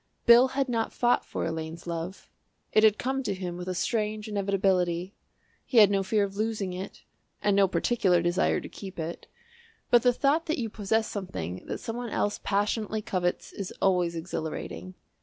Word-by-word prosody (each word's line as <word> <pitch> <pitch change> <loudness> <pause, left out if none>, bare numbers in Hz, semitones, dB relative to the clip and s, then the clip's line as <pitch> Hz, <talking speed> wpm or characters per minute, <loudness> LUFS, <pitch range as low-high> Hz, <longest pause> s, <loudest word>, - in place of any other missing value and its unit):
Bill 240 +2 +8
had 275 -1 +2
not 230 -2 -1
fought 245 0 +2
for - - -4
Elaine's 160 +1 -5
love; 170 +2 -5 0.5
it 215 - +5
had 215 -1 +6
come 265 +2 -1
to 205 -7 -2
him 180 -2 -5
with 180 +1 -6
a 185 - -2
strange 215 +2 -1
inevitability. 190 -3 0 0.5
He 250 - -2
had 210 -3 +8
no 195 -1 +2
fear 205 +2 +1
of 195 -1 -4
losing 210 -3 -2
it 185 +2 -7 0.4
and 205 -1 +2
no 200 -1 +5
particular 180 0 +2
desire 175 +1 +2
to - - -7
keep 195 -2 -9
it, 165 +1 -5 0.6
but 240 - +7
the 245 +1 +4
thought 290 +7 +1
that 315 - 0
you 225 -4 -3
possess 220 +2 0
something 185 - -5
that - - -3
some 225 +1 -4
one 245 -1 -4
else 205 -1 -1
passionately 210 +1 0
covets 180 -2 -2
is 195 -2 -5
always 180 -3 +2
exhilarating. 165 +2 -5
200 Hz, 180 wpm, -28 LUFS, 180-225 Hz, 0.6 s, Bill